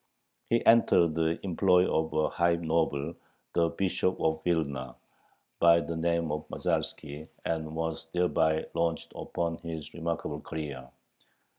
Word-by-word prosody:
He 115 Hz, -, +2 dB
entered 90 Hz, -8 st, +5 dB
the 80 Hz, +1 st, 0 dB
employ 90 Hz, 0 st, +3 dB
of 80 Hz, 0 st, 0 dB
a 80 Hz, 0 st, +2 dB
high 85 Hz, 0 st, +2 dB
noble, 80 Hz, -2 st, 0 dB, 0.4 s
the 85 Hz, -1 st, +3 dB
Bishop 95 Hz, 0 st, 0 dB
of 80 Hz, 0 st, 0 dB
Vilna, 70 Hz, -7 st, -1 dB, 0.6 s
by 85 Hz, 0 st, +6 dB
the 85 Hz, 0 st, -4 dB
name 85 Hz, -1 st, 0 dB
of 75 Hz, +1 st, -4 dB
Masalski, 75 Hz, +1 st, -3 dB, 0.2 s
and 80 Hz, -1 st, -2 dB
was 80 Hz, 0 st, -3 dB
thereby 80 Hz, -3 st, +2 dB
launched 85 Hz, 0 st, -1 dB
upon 85 Hz, -1 st, -3 dB
his 80 Hz, -3 st, -7 dB
remarkable 85 Hz, -1 st, -3 dB
career. 70 Hz, -5 st, -6 dB
80 Hz, 130 wpm, -29 LUFS, 80-85 Hz, 0.6 s, by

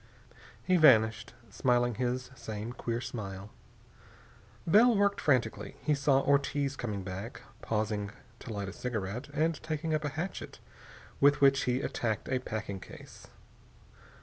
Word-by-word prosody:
He 185 Hz, -1 st, +3 dB
vanished, 110 Hz, -8 st, +4 dB, 0.2 s
smiling 120 Hz, -1 st, +2 dB
his 125 Hz, +2 st, -2 dB
same 110 Hz, -1 st, -6 dB
queer 120 Hz, -1 st, -3 dB
smile. 100 Hz, -4 st, -6 dB, 1.1 s
Bell 220 Hz, +6 st, +6 dB
worked 200 Hz, 0 st, +2 dB
frantically. 125 Hz, -6 st, 0 dB
He 150 Hz, -, +2 dB
saw 140 Hz, -1 st, +3 dB
Ortiz 140 Hz, 0 st, +1 dB
coming 105 Hz, -7 st, -4 dB
back, 95 Hz, +5 st, -7 dB, 0.2 s
pausing 105 Hz, -2 st, -1 dB, 0.3 s
to 120 Hz, -, -8 dB
light 100 Hz, -2 st, -3 dB
a 95 Hz, -, -6 dB
cigarette, 115 Hz, +1 st, -4 dB
and 155 Hz, +2 st, 0 dB
taking 160 Hz, 0 st, -2 dB
up 155 Hz, 0 st, 0 dB
a 145 Hz, -, -1 dB
hatchet, 160 Hz, +6 st, -5 dB, 0.6 s
with 145 Hz, +1 st, +5 dB
which 135 Hz, -1 st, +4 dB
he 125 Hz, +1 st, +1 dB
attacked 110 Hz, -6 st, -2 dB
a 130 Hz, 0 st, +1 dB
packing 110 Hz, -5 st, -5 dB
case. -, -, -12 dB
125 Hz, 135 wpm, -31 LUFS, 110-145 Hz, 1.1 s, Bell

